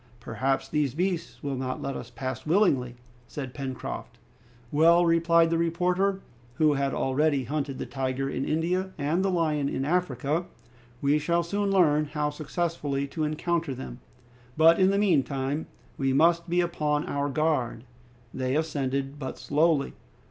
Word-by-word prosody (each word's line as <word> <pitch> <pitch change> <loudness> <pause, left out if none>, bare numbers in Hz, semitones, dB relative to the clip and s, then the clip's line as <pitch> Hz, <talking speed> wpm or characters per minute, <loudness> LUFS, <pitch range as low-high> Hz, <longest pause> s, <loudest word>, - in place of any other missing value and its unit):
"Perhaps 135 +3 -1
these 145 -4 0
beasts 175 -2 -2
will 140 -1 -2
not 130 0 -3
let 135 -1 -4
us 120 - -7
pass 130 0 -5
by - - -9
willingly," 140 - +2 0.3
said 130 -4 -6
Pencroft. 130 -3 -6 0.5
"Well," 170 +3 +5
replied 165 0 +4
the 165 - +1
reporter, 180 +4 +1 0.3
who 155 +1 +3
had 140 -1 0
already 140 +1 +1
hunted 140 +1 -3
the - - -4
tiger 135 0 -2
in 135 -1 -2
India, 180 +5 -1
and 155 +5 0
the 195 - +2
lion 155 -5 +1
in 135 - -2
Africa, 160 -1 0 0.6
"we 145 +2 +3
shall 170 +3 +1
soon 200 +4 -1
learn 155 -6 +4
how 150 0 -2
successfully 150 -2 -2
to 155 +2 -3
encounter 155 -1 -1
them. 65 - -8 0.6
But 165 +2 +6
in 190 0 +5
the 200 - +2
meantime 145 -6 +1 0.3
we 135 -1 +1
must 170 +4 +3
be 175 +1 +3
upon 150 -4 0
our 140 0 -1
guard!" 145 -6 0 0.5
They 130 0 -1
ascended 140 -2 -2
but 130 -2 -5
slowly. 150 -1 +1
150 Hz, 155 wpm, -27 LUFS, 135-170 Hz, 0.6 s, But